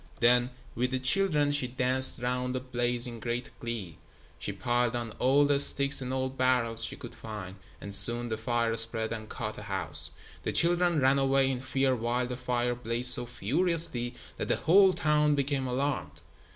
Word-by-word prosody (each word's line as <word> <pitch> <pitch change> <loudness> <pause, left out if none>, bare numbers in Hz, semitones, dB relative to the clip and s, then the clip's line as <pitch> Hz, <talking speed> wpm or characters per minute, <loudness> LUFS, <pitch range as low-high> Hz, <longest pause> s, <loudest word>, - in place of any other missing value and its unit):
Then, 120 +1 +3 0.2
with 125 +2 -1
the 130 - -2
children, 150 +2 +2
she 145 -3 0
danced 130 +1 +1
round 125 +1 -2
the - - -1
blaze 120 -1 +1
in 120 -2 -6
great 120 +2 -4
glee. 110 -9 -6 0.4
She - - -3
piled 120 -1 -1
on 120 -2 -4
all 140 +3 +3
the 145 -1 +1
sticks 140 -1 +5
and 130 0 -5
old 130 0 -4
barrels 120 -3 +1
she 115 - -3
could - - -10
find, 100 -4 -9 0.2
and 100 - -7
soon 120 +3 +5
the 110 - -2
fire 115 +1 -1
spread 115 0 +1
and 110 -1 -8
caught - - -6
a - - -10
house. - - -1 0.3
The - - -4
children 175 -1 +2
ran 135 +1 +3
away 135 0 +2
in 125 -1 -4
fear 130 0 0
while 120 +2 -2
the 125 0 -5
fire 125 -1 -2
blazed 120 +1 +4
so 120 -1 +1
furiously 140 - -1 0.2
that - - -4
the - - +1
whole 190 +3 +4
town 150 -2 +1
became 140 -1 -1
alarmed. 135 +3 -3
125 Hz, 185 wpm, -28 LUFS, 120-135 Hz, 0.4 s, sticks